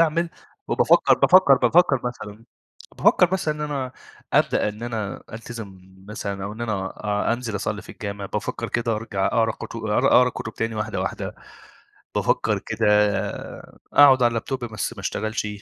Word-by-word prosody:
أعمل 165 +1 +2 0.4
وبافكّر - - +4
بافكّر 185 -6 +6
بافكّر 135 +2 +3
مثلًا، 115 -3 -6 0.5
بافكّر 180 - +5
مثلًا 165 -5 0
إن 150 - -9
أنا 140 -4 -3 0.4
أبدأ - - +2
إن 105 +2 -8
أنا 110 -4 -4
ألتزم 110 -4 -8 0.3
مثلًا 100 -2 -5
أو 100 - -5
إن 110 - -10
أنا 105 -5 -2 0.4
أ - - +4
أنزل 120 -3 -3
أصلّي 105 +1 -3
في - - -11
الجامعة، 100 -1 -6
بافكّر - - -3
كده 115 -2 -1
أرجع 100 -3 -2
أقرا 115 -1 +1
كت 115 - -9
أ 110 -2 -1
أقرا 125 0 +5
كُتب 110 - -6
تاني 115 0 -2
واحدة، 110 0 -3
واحدة، - - -4 0.8
بافكّر - - +1
كده - - -2 1.1
أقعد 135 -3 +7
على - - +6
اللاب 115 -1 -3
توب 130 -3 -3
بس 110 +1 -4
ما 115 - -12
أشتغلش، 110 +3 -3
115 Hz, 160 wpm, -23 LUFS, 105-125 Hz, 1.1 s, أقعد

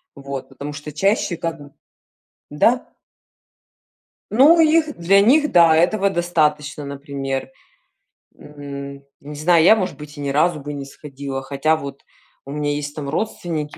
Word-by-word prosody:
вот, 140 -1 -7
потому 145 +1 -7
что 150 +1 -8
чаще 190 +2 0
как, 165 -1 -4 0.9
да. 230 +12 +2 1.4
Ну, 285 +10 +6
их 315 -1 +3
для 195 +4 +4
них, 295 +7 +4
да, 165 -2 +6
этого 195 +4 +2
достаточно, 150 -4 0
например. 140 - -5 0.9
М, 140 -1 -9 0.2
не 150 +1 -10
знаю, 165 +2 +3
я, 215 - +7
может 185 -9 -3
быть, 150 0 -11
и 145 - -7
ни 140 - -2
разу 155 +3 +1
бы 145 +1 -7
не 140 -1 -6
сходила, 140 -1 -7
хотя, 145 +3 +1
вот, 140 -3 -8 0.4
у 140 - -8
меня 145 0 -2
есть 145 0 -5
там 145 -2 -5
родственники, 160 -3 -3
150 Hz, 145 wpm, -20 LUFS, 140-175 Hz, 1.4 s, я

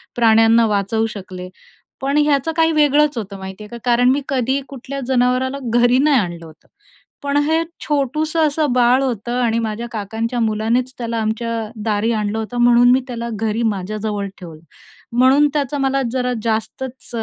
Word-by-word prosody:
प्राण्यांना 225 0 +5
वाचवू 210 +2 0
शकले. 185 -2 -8 0.5
पण 275 +2 0
याचं 295 0 +2
काही 325 0 +4
वेगळंच 295 -2 +3
होतं, 200 -2 -5
माहिती 190 +2 -8
आहे 210 - -10
का. 235 - -8
कारण 245 +1 +4
मी 275 +3 +2
कधीही 265 +1 0
कुठल्या 275 +1 -7
जनावराला 255 +1 +1
घरी 240 +2 +3
नाही 285 -2 +4
आणलं 170 -4 -4
होतं, 160 0 -17 0.6
पण 285 0 0
हे 320 +2 +1 0.2
छोटूसं 305 +3 0
असं 295 -1 0
बाळ 250 +1 +4
होतं 240 -1 -2
आणि 230 -1 +1
माझ्या 225 +1 -3
काकांच्या 225 +3 -3
मुलानेच 230 +3 0
त्याला 230 -1 -3
आमच्या 225 +2 -2 0.3
दारी 215 +2 +1
आणलं 215 -1 -1
होतं, 220 +2 -5
म्हणून 240 0 +5
मी 260 +1 +4
त्याला 235 -2 -5
घरी 225 +2 -1
माझ्याजवळ 210 0 -2
ठेवलं. 165 -4 -11 0.6
म्हणून 270 +4 +5
त्याचं 290 -1 -1
मला 270 0 +1
जरा 250 -1 -1
जास्तच 240 +4 -4
240 Hz, 160 wpm, -19 LUFS, 220-270 Hz, 0.6 s, प्राण्यांना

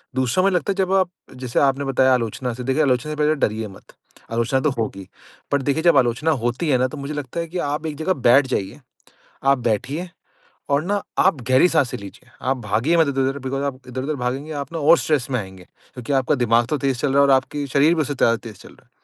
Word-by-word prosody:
दूसरा 130 +7 +1
मुझे 195 -2 +2
लगता 190 +3 0
है - - -2
जब 190 -1 0
आप 190 -2 +3 0.3
जैसे 125 -2 -2
आपने 140 0 +2
बताया 130 -1 +3
आलोचना 125 +1 -2
से 125 +2 -7
देखिए 135 +4 +1
आलोचना 130 +2 0
से - - -3
पहले 150 +1 +2
डरिए 110 -5 -1
मत। 95 - -16 0.4
आलोचना 115 +3 +1
तो 150 - +1
होगी। 100 -4 -4 0.4
पर 145 -1 +2
देखिए 145 +4 -1
जब 170 -5 +5
आलोचना 130 +6 +2
होती 125 +7 -1
है 130 - +4
ना 130 +1 +1
तो 145 - -9
मुझे 140 +2 -5
लगता 145 +1 -5
है 170 - -3
कि 180 +3 -6
आप 150 +2 -3
एक 150 - -4
जगह 160 +4 0
बैठ 130 +3 +6
जाइए। 110 +1 -3 0.6
आप 135 0 +4
बैठिए 140 - -2 0.6
और 140 +2 +2
ना 200 +1 -1 0.2
आप 180 -7 +3
गहरी 130 +7 +5
साँसे 150 -7 +1
लीजिए, 100 +5 -12 0.2
आप 135 - +2
भागिए 115 +11 +1
मत 160 -3 +3
इधर-उधर 135 0 0
बिकॉज़ 135 +1 -2
आप 140 -2 -3
इधर-उधर 130 +4 -3
भागेंगे 135 +3 -3
आप 140 +1 -5
ना 165 - -3
और 160 +2 +5
स्ट्रेस 145 -5 0
में 125 - 0
आएँगे। 95 -3 -8 0.3
क्योंकि 125 +2 -5
आपका 135 +1 +2
दिमाग 120 -2 +2
तो 150 - 0
तेज़ 135 -3 -1
चल 135 0 0
रहा 140 - +2
है - - +7
और - - +4
आपके 140 +2 -1
शरीर 145 +5 +3
भी 160 - -1
उससे 145 0 -3
ज़्यादा 115 -3 +3
तेज़ 115 -1 -10
चल - - -14
रहा - - -20
है। - - -36
135 Hz, 245 wpm, -21 LUFS, 125-150 Hz, 0.6 s, है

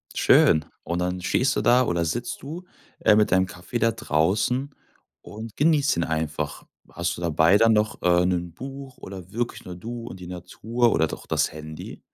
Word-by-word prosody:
Schön. 80 -1 +5 0.2
Und 85 +1 -2
dann 90 0 -2
stehst 130 +8 +1
du - - +1
da 125 +1 +5
oder 85 -3 0
sitzt 120 +8 -3
du, 160 +7 -7 0.4
äh, 105 - +5
mit 105 -3 +3
deinem 95 +1 +4
Kaffee 90 +5 -6
da 115 0 +3
draußen 110 - 0 0.5
und 110 +1 -9
genießt 145 - +3
ihn 85 - +1
einfach. 75 -2 -3 0.2
Hast 85 0 -2
du 85 - -8
dabei 85 +3 +4
dann 115 +1 +5
noch, 105 0 0
äh, 90 0 +3
'nen 90 -2 -1
Buch 135 +3 -9
oder 95 -1 -10
wirklich 120 +2 -3
nur 90 - -8
du 115 +6 -7
und 95 - -8
die 90 - -9
Natur 110 +7 -1
oder 80 - +2
doch - - -8
das - - +1
Handy? 80 0 -8
95 Hz, 190 wpm, -24 LUFS, 85-120 Hz, 0.5 s, Schön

